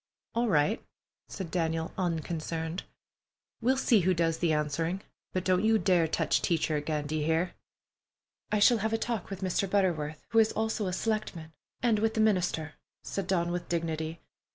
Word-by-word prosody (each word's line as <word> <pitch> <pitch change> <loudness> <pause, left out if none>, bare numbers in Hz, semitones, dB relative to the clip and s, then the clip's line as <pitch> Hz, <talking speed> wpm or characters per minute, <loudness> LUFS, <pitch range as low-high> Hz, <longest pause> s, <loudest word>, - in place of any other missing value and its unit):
"All 235 0 +1
right," 155 +5 +2 0.4
said 185 -4 -6
Daniel, 165 -2 -1
unconcerned. 165 -1 -2 0.8
"We'll 260 +3 +3
see 235 -4 +4
who 185 0 +2
does 165 -1 +1
the 170 -2 +2
answering, 155 +5 0 0.3
but 185 - -1
don't 185 +1 +2
you 220 0 +4
dare 180 -5 +3
touch - - +1
Teacher 165 -2 +1
again, 150 0 -1
d'ye 155 +1 -1
hear?" 165 +3 +1 1.0
"I 210 - +3
shall 220 +3 +5
have 220 +2 -1
a - - +3
talk 225 -5 -3
with 195 -1 -6
Mr. 190 +1 0
Butterworth, 165 -7 0
who 225 - +4
is 220 -1 +4
also 220 -2 -1
a 180 - -2
selectman, 185 -7 -2 0.3
and 230 -3 +3
with 220 +1 +1
the - - 0
minister," 180 -7 +1 0.3
said 195 -3 -3
Dawn, 175 -2 +1
with 175 0 -4
dignity. 165 -1 -2
175 Hz, 170 wpm, -30 LUFS, 160-210 Hz, 1.0 s, shall